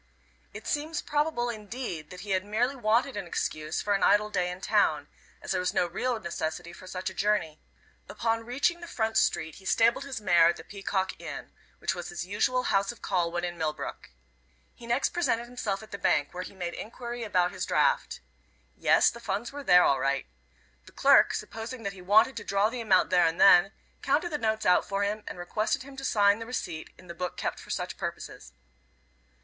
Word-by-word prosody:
It - - -10
seems 305 +2 -1
probable 295 -5 0
indeed, 215 -7 -6
that 180 0 -9
he 200 0 -6
had 185 -1 +1
merely 230 +6 0
wanted 240 +2 +1
an 205 - -4
excuse 155 -2 -2
for 205 - +1
an 195 - +1
idle 210 +1 +4
day 180 -3 0
in 180 +1 -6
town; - - +1 0.3
as - - -4
there - - +1
was 180 - -1
no - - +3
real 230 +7 -2
necessity 170 -2 -4
for 185 - -12
such 185 0 -4
a - - -11
journey. 180 -6 0 0.5
Upon 225 0 -1
reaching 275 +9 0
the 340 - -8
front 225 -6 -2
street 160 -6 +1
he 190 - -15
stabled 230 +6 +3
his 275 -3 -5
mare 175 -5 +5
at 170 - +2
the - - -10
Peacock 195 0 -3
Inn, - - -7 0.3
which - - -1
was 175 -1 -6
his 175 0 -5
usual 215 +6 +1
house 200 0 +1
of 240 - -16
call 175 -3 0
when 175 0 -2
in 175 -1 -4
Millbrook. 155 -1 -4 0.6
He 235 - -13
next 240 +4 +1
presented 255 -9 0
himself 220 -4 -3
at 215 - -14
the 200 - -6
bank, 145 -4 +1
where 180 - -4
he 185 - -9
made 175 -2 -4
enquiry 240 +2 -6
about 180 -5 +1
his - - -4
draft. - - +1 0.5
Yes, - - +4
the 235 - -10
funds 215 0 -3
were 285 0 -7
there 180 -7 +7
all 135 - +3
right. 135 +1 0 0.6
The - - -15
clerk, - - +6
supposing 225 +2 -6
that 200 -1 -3
he 190 - -12
wanted 215 +8 +4
to - - -5
draw 200 +2 +1
the 250 -1 -4
amount 195 -5 +3
there 175 -2 +5
and 165 +1 -2
then, 195 0 +7 0.3
counted 345 - +1
the 295 - -2
notes 220 -1 -1
out 180 - +5
for 200 0 0
him, 210 +1 -2
and - - -6
requested 215 +7 -1
him 275 0 -12
to 270 - -6
sign 205 -4 +3
the 225 - -7
receipt 175 -10 -4
in 185 - -16
the 170 - -8
book 180 +1 -5
kept - - -3
for - - -13
such - - -3
purposes. - - -6
205 Hz, 210 wpm, -28 LUFS, 180-235 Hz, 0.6 s, there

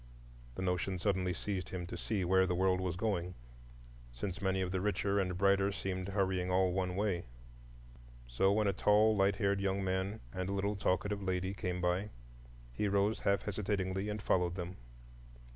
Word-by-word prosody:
The 95 - -3
notion 90 +1 0
suddenly 95 -1 0
seized 95 +1 -3
him 90 -2 -4
to 85 - -6
see 100 -5 -2
where 95 +1 +4
the 90 - 0
world 95 0 +2
was 90 -3 -2
going; 90 -3 -1 0.8
since 90 - -5
many 95 -1 +1
of 90 -1 -1
the 95 -1 -1
richer 100 0 +1
and 90 -2 -1
brighter 100 +1 +3
seemed 95 -2 -3
hurrying 95 -2 0
all 90 0 +3
one 90 -1 -1
way. 100 -3 0 1.0
So - - +2
when 105 +1 +2
a 100 - +2
tall, 105 +3 +4
light 100 0 +3
haired 100 -1 +1
young 100 0 0
man 95 +2 -1
and 95 0 -3
a - - -1
little 100 +1 0
talkative 100 +1 0
lady 95 0 -1
came 90 -2 -3
by, 90 +4 0 0.6
he 105 - 0
rose 100 +2 +2
half 100 0 +1
hesitatingly 100 -1 -2
and 105 0 -3
followed 90 -1 +1
them. 90 0 -5
95 Hz, 175 wpm, -34 LUFS, 90-100 Hz, 1.0 s, where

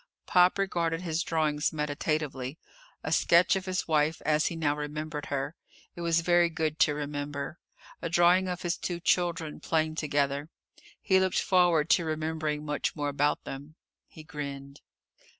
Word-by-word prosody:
Pop 180 0 +4
regarded 170 -4 0
his 165 -2 -1
drawings 155 -3 0
meditatively. 150 -2 -2 0.5
A - - -3
sketch 170 +3 +4
of 190 0 -3
his 185 0 -2
wife 155 0 +2
as 155 0 +2
he 170 - -3
now 150 -3 0
remembered 150 0 -5
her. 140 +1 -2 0.4
It 175 - -7
was 170 0 +2
very 175 0 +4
good 160 -1 -2
to 150 - +4
remember. 145 +1 -4 0.4
A 170 - -3
drawing 175 +3 +4
of 180 -1 -4
his 175 -1 -1
two 175 -1 -4
children, 170 -3 0
playing 155 -1 0
together. 145 -1 -1 0.5
He 190 -2 +3
looked 190 -1 +1
forward 175 -4 +3
to 170 - +4
remembering 155 -1 -2
much 150 -1 -2
more 145 -2 -1
about 145 +1 0
them. 145 +3 -8 0.3
He 155 - -13
grinned. 140 -2 -7
155 Hz, 155 wpm, -29 LUFS, 150-170 Hz, 0.5 s, Pop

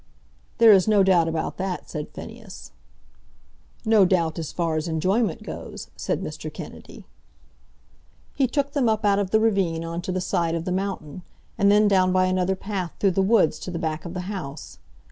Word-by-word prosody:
"There 230 -2 +8
is 190 -2 +5
no 210 -2 +5
doubt 180 -3 +4
about 160 -1 -3
that," 190 -1 -4
said 150 -2 -5
Phineas. 225 -4 -11 1.1
"No 220 -2 +5
doubt 170 -3 +1
as 160 - -5
far 165 -2 -1
as 155 +2 -2
enjoyment 185 +6 0
goes," - - -8
said - - -2
Mr. - - -6
Kennedy. - - -10 1.3
He 270 -2 +1
took 280 +2 -1
them 265 -6 +2
up 215 -1 0
out 200 -1 +3
of 200 -2 -1
the 220 - +3
ravine 190 -7 +1
on 170 +1 -4
to 185 - -4
the 185 - -1
side 170 -2 0
of 165 0 -3
the 180 - -2
mountain, 185 -4 -3 0.3
and 200 0 +3
then 210 +1 +5
down 185 -2 +3
by 185 0 +3
another 185 +1 +1
path 190 -3 -4
through 195 - +3
the 195 - +1
woods 195 -4 +3
to - - -7
the 175 - -4
back 160 -2 -3
of 170 +1 -7
the 180 - -2
house. 180 -7 -7
185 Hz, 190 wpm, -24 LUFS, 170-205 Hz, 1.3 s, There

